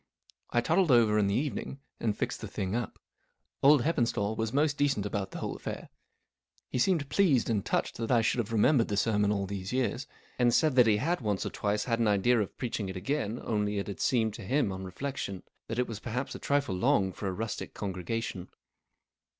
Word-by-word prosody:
I 120 - +2
toddled 170 +6 +2
over 115 -4 +5
in 100 - +3
the 100 - +1
evening 140 -1 -3 0.2
and 105 -3 -1
fixed - - -2
the - - -5
thing 95 +2 -3
up. 120 -3 -3 0.6
Old 140 -2 +6
Heppenstall 115 -8 0
was 110 0 -2
most 145 +2 +2
decent 140 -8 +1
about 100 -1 -2
the - - -8
whole - - -4
affair. - - -6 0.8
He - - -1
seemed 160 -1 +2
pleased 145 - +3
and 105 -3 0
touched - - -1
that 115 -1 -3
I 120 -3 +4
should 120 - +1
have 115 -1 -2
remembered 115 +3 +4
the 100 - -2
sermon 105 -1 +2
all 100 -2 0
these 95 0 -5
years, 130 +1 -1 0.3
and 120 -1 +4
said 155 -4 +3
he 105 -2 +4
had 165 +7 0
once 105 -4 -1
or - - -3
twice 105 0 -1
had 115 -2 -1
an 115 - +2
idea 105 +3 +3
of 100 - -5
preaching 115 -5 -3
it 95 - -5
again, 115 +2 -2
only 105 -2 -1
it 100 - -1
had 100 - -7
seemed 110 -4 +1
to - - -9
him, 130 +1 +1
on 95 0 -5
reflection, 100 -1 -5 0.2
that 115 - -4
it 125 - +1
was 110 -3 -6
perhaps 125 +4 -4
a - - -7
trifle 140 -7 0
long 95 +1 +2
for 100 - -5
a - - 0
rustic 110 +4 -5
congregation. 95 0 -4
115 Hz, 210 wpm, -30 LUFS, 100-130 Hz, 0.8 s, Old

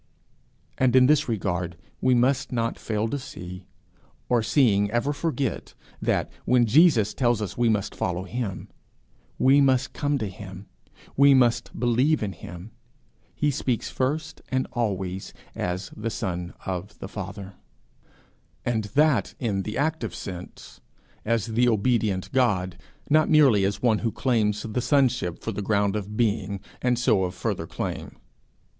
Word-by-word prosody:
And 130 -1 +3
in 130 -1 +7
this 145 -1 +3
regard 90 -6 -2 0.2
we 130 -1 +4
must 130 +3 +2
not 115 -2 -1
fail 110 0 -1
to 145 - -2
see, 90 -7 -9 0.6
or 120 -2 +3
seeing 110 -3 +3
ever 120 +6 0
forget, 145 -4 -3 0.3
that, - - 0
when 125 -1 +4
Jesus 115 - +4
tells 120 -3 +1
us 105 -4 -4
we 120 -1 +2
must 105 -3 0
follow 90 0 -2
him, 110 -2 -4 0.7
we 135 +2 +5
must 130 -2 +2
come 145 -1 0
to 110 - -2
him, 95 0 -9 0.5
we 140 0 +6
must 120 -2 +2
believe 125 +4 +2
in 100 -2 -3
him, 90 +5 -10 0.6
he 150 -1 +1
speaks 125 -3 -2
first 140 +5 -2
and 130 0 0
always 95 -5 -3 0.2
as 90 +1 -3
the 110 +2 -3
Son 90 -4 -4
of 95 +2 -5
the - - -7
Father 100 -1 -7 1.1
and 110 -3 0
that 150 -3 +3
in 105 -6 -1
the 105 +2 -5
active 155 -5 -1
sense, 90 -2 -9 0.4
as 115 -1 +1
the 120 +2 +2
obedient 105 -4 +1
God, 95 -9 +1 0.3
not 155 +1 +3
merely 135 -10 +5
as 100 +4 -2
one 115 -3 +3
who 115 - -1
claims 105 -5 0
the 115 +2 -2
sonship 125 - +1
for 115 - -2
the 105 - -4
ground 100 0 +1
of 105 0 -4
being 100 -4 0 0.2
and 125 -1 +2
so 110 -5 +3
of 90 0 -3
further 90 -3 -3
claim. - - -5
115 Hz, 150 wpm, -25 LUFS, 100-130 Hz, 1.1 s, in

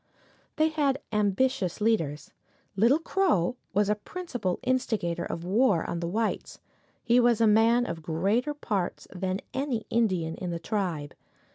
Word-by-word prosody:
They 310 +1 +3
had 285 -4 +1
ambitious 210 -1 +1
leaders. 165 -10 0 0.4
Little 230 +9 +4
Crow 325 - +1 0.2
was 205 +1 +2
the 210 - +3
principal 220 - -4
instigator 210 -9 0
of 170 - -5
war 200 -1 +2
on 170 - -3
the 170 - -3
whites. 220 +5 -2 0.5
He 240 +1 +4
was 240 -2 +4
a 230 - +4
man 225 +3 +4
of 170 -4 -5
greater 200 - 0
parts 200 -10 -3
than 190 +1 -2
any 265 -5 -2
Indian 185 -8 +1
in 180 - -4
the 170 - -2
tribe. 170 -7 -3
210 Hz, 145 wpm, -28 LUFS, 175-245 Hz, 0.5 s, Little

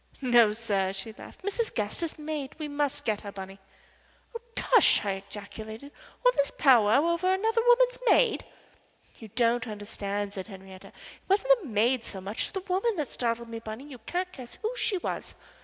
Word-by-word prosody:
"No, 240 -5 +5
sir," 200 -4 -1
she 195 +3 -5
laughed. - - -13
"Mrs. 415 +3 -1
Gaster's 220 +10 -1
maid. 300 -3 -5
We 305 -1 -4
must 290 0 -1
get 215 -2 0
her, 200 - -7
Bunny." 195 0 -9 0.8
"Oh, 465 - -5
tush!" 475 - +5
I 195 -1 -1
ejaculated. 220 +5 -9 0.3
"All - - +8
this 280 - +1
powwow 250 0 +5
over 365 +2 +1
another 445 +4 +2
woman's - - +4
maid!" 475 -2 +4 0.8
"You 225 - -9
don't 235 +2 +1
understand," 205 -1 -4
said 190 -3 -6
Henriette. 190 -2 -11
"It - - -14 0.4
wasn't 480 +5 +4
the 340 - -8
maid 235 +2 +2
so 195 - -6
much 195 +4 -2
as - - -8
the 385 - -3
woman 390 +4 0
that 300 -5 -2
startled 235 -1 -2
me, 230 0 -5
Bunny. 220 +3 -7
You 280 -4 -11
can't 360 +10 -3
guess 255 -7 -9
who 450 +3 -1
she 430 -5 0
was." - - -5
245 Hz, 180 wpm, -28 LUFS, -, 0.8 s, All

